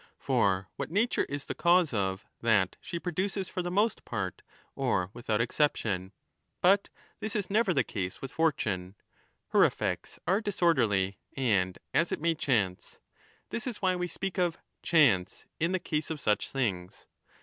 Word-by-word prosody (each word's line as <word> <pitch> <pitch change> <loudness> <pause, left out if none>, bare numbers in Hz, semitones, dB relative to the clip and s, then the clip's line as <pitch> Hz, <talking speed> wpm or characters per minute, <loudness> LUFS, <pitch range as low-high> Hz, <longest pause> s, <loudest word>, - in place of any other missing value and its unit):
For 95 -2 +1
what - - -3
nature 210 +8 +1
is 145 -1 -5
the - - -3
cause 175 -4 +3
of, 95 -1 -1 0.2
that 105 -5 +3
she 175 - -5
produces 190 +3 -2
for 180 - -3
the 175 - -3
most 205 +5 +1
part 95 -2 -4 0.3
or 90 +1 0
without 115 -3 -1
exception,' 115 -7 0 0.5
but 195 +2 +4 0.3
this 220 -1 -4
is 200 -2 -1
never 215 -1 +3
the 135 -7 +3
case 95 -5 -4
with 135 - -6
fortune 105 - 0 0.3
— - - -41
her - - +7
effects - - -1
are 195 +4 +2
dis 205 -3 -3
1207* - - -9
orderly 100 - +2 0.2
and 100 -8 +1 0.2
as 170 - +2
it - - -1
may 165 +2 +2
chance; 105 - -1 0.5
this 235 - -3
is 230 -5 -5
why 185 -1 +3
we 180 0 -2
speak 195 +2 -4
of 175 -2 +1
' - - -51
chance 125 - +4
' - - -51
in 165 +2 +1
the 185 - +2
case 155 -4 -2
of 160 -2 -3
such 105 -5 +1
things. 95 -9 -3
145 Hz, 180 wpm, -30 LUFS, -, 0.5 s, her